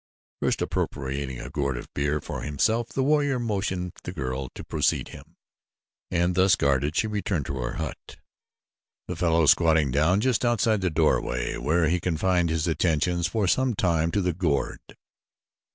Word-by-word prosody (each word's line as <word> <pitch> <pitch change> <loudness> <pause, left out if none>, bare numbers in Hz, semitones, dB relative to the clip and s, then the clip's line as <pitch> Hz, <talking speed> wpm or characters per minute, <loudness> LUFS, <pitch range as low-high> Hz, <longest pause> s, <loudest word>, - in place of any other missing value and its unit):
First - - +1
appropriating 70 -2 -3
a 65 - -8
gourd 70 -4 -1
of - - -7
beer 75 +1 0
for - - -6
himself 110 +11 0
the 135 - -1
warrior 145 -1 +2
motioned 95 -6 -2
the - - -6
girl 65 0 -4
to - - -7
precede - - 0
him, - - -13 0.7
and 85 +1 +1
thus 95 +1 +4
guarded 70 +2 +1
she - - +2
returned 100 -8 -2
to 70 - -4
her 60 0 -3
hut, - - -6 0.9
the - - -4
fellow 85 -2 +2
squatting 80 -3 +4
down 80 +8 +3
just 125 0 +1
outside 115 -3 +2
the 95 - +1
doorway, 80 -1 0
where 80 +2 +1
he 90 +3 +1
confined 90 0 +1
his 80 0 0
attentions 85 +1 +1
for 100 +2 0
some 130 +4 +2
time 85 -4 +1
to 100 +4 0
the 90 -1 0
gourd. 80 -5 -1
85 Hz, 165 wpm, -26 LUFS, 75-95 Hz, 0.9 s, thus